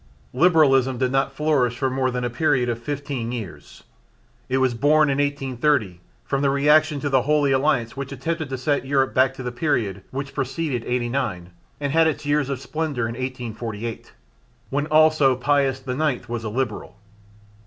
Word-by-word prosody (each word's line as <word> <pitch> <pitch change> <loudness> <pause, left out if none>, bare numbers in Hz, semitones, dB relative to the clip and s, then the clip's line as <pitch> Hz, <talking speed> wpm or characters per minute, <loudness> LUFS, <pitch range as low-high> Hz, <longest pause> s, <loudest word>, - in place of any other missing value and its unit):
Liberalism 135 -4 +4
did 125 0 0
not 135 +1 +1
flourish 135 -4 +1
for 135 - 0
more 130 0 0
than 125 -1 -3
a 120 - -1
period 125 -2 +1
of 115 -1 -2
fifteen 140 -3 -4
years. 95 -12 -8 0.7
It 130 - +1
was 130 -2 +2
born 145 +4 +3
in 135 - -1
1830 135 - 0 0.2
from 135 -1 -1
the 140 - +2
reaction 150 +2 +3
to 145 - -1
the 130 -1 +4
Holy 145 +1 +2
Alliance 130 -4 +1
which 135 0 -6
attempted 160 +3 -3
to 130 - -3
set 145 +3 0
Europe 135 -1 +1
back 130 +1 +3
to 130 - -7
the 125 - -3
period 115 - -1
which 135 +1 -5
preceeded 135 -2 -2
'89 120 -7 -2 0.3
and 145 -1 -2
had 165 0 +5
its 150 -1 -2
years 145 -1 +1
of 135 -2 -3
splendour 150 -3 -3
in 115 - -3
1848, 115 -3 -5 0.6
when 145 +2 -1
also 155 -3 +4
Pius 135 0 0
IX 130 0 -1
was 120 -1 -4
a 110 - -3
Liberal. 105 -5 -3
135 Hz, 175 wpm, -23 LUFS, 125-145 Hz, 0.7 s, had